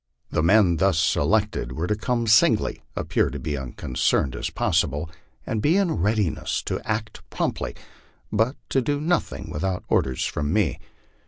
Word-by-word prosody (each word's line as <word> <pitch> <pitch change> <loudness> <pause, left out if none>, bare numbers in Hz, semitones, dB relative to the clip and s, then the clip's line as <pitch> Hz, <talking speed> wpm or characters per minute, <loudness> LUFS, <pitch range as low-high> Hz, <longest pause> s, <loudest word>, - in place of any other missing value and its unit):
The - - +1
men 90 0 +4
thus 95 0 +2
selected 65 -4 +1
were 80 +5 -2
to 105 - 0
come 120 +2 -1
singly, 110 -1 +4
appear - - +1
as 75 -2 -3
unconcerned 65 0 -1
as - - -3
possible, 80 -1 0 0.3
and 110 - -2
be 160 - +3
in 195 -4 +2
readiness 105 - 0
to - - -2
act 110 0 -3
promptly, - - -2 0.6
but 110 +6 +1
to 135 - +2
do 145 +3 -1
nothing 165 +3 -1
without 90 +4 -2
orders 65 -1 +1
from 75 0 -2
me. 95 - +1
95 Hz, 150 wpm, -24 LUFS, 80-110 Hz, 0.6 s, men